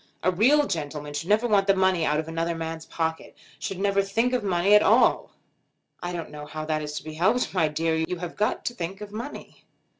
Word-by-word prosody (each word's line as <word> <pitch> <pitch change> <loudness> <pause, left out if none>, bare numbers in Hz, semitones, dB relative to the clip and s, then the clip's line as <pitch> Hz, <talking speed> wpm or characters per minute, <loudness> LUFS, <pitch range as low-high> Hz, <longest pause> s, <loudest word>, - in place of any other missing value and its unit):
A 185 - +3
real 265 +11 +4
gentleman 150 - -4
should 145 +5 -4
never 215 +3 +3
want 205 -3 +3
the 195 - +5
money 190 -3 +2
out 150 +1 +1
of 160 - -4
another 165 +1 -2
man's 165 0 -5
pocket; 160 -1 -3 0.2
should 195 - -4
never 200 0 +2
think 225 +6 0
of 250 -3 0
money 190 +1 +2
at 210 - +8
all." - - +4 0.7
"I 175 - -3
don't 170 -3 -5
know 150 0 -8
how 155 +1 -6
that 155 0 -1
is 150 -1 -5
to - - -6
be 155 0 -7
helped, 215 +10 +1
my 170 -5 +2
dear. 160 +2 -1
You 180 - -3
have 175 0 -6
got 210 - -1
to 240 - -1
think 190 0 -5
of 205 -1 -8
money." 235 +7 -8
175 Hz, 230 wpm, -25 LUFS, 160-205 Hz, 0.7 s, at